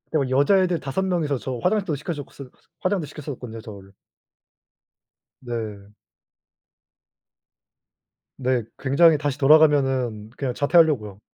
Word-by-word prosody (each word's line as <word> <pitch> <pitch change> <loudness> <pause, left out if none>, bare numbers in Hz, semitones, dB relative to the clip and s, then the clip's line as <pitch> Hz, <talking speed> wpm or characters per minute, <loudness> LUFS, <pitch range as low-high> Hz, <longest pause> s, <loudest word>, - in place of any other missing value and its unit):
어 155 - +3
여자애들 175 +6 +3
5 140 +7 -3
명이서 165 -7 -1
저 125 -1 -5
화장도 190 - 0
시켜줬을 145 -3 -7 0.3
화장도 185 -3 0
시켜줬었거든요 130 -6 -8
저를. 100 -3 -12 1.5
네. 105 -4 -6 2.4
네 130 -3 -1
굉장히 155 +4 +4
다시 145 -1 -3
돌아가면은 135 -7 +3
그냥 130 -3 -3
자퇴하려고요. 140 - +2
140 Hz, 255 characters per minute, -23 LUFS, 120-155 Hz, 2.4 s, 굉장히